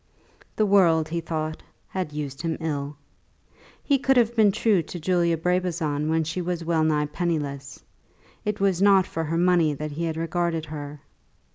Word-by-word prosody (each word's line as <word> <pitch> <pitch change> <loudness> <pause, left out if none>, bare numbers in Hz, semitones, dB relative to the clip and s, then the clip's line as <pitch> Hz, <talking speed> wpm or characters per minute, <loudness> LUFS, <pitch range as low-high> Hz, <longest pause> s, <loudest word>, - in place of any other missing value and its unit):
The 215 - +2
world, 170 -6 +4
he 170 +1 -2
thought, 155 -1 -4 0.3
had 185 -5 -3
used 145 -2 -5
him 165 -2 -2
ill. 145 -3 -3 0.9
He 280 -2 +2
could 270 -1 +2
have 235 -1 +3
been 215 -3 +5
true 200 -2 +2
to 175 +2 -8
Julia 170 0 +1
Brabazon 165 -4 -1
when 160 0 +2
she 160 +4 -3
was 175 -1 -3
well 165 -1 +1
nigh 150 -1 +2
penniless. 150 -3 -3 0.6
It 210 0 -2
was 195 -2 +1
not 195 -2 +5
for 165 - -4
her 165 +2 -1
money 170 -4 +3
that 150 +2 -5
he 165 +4 -3
had 160 -1 -3
regarded 165 -1 -1
her. 145 -1 -8
165 Hz, 170 wpm, -25 LUFS, 155-180 Hz, 0.9 s, been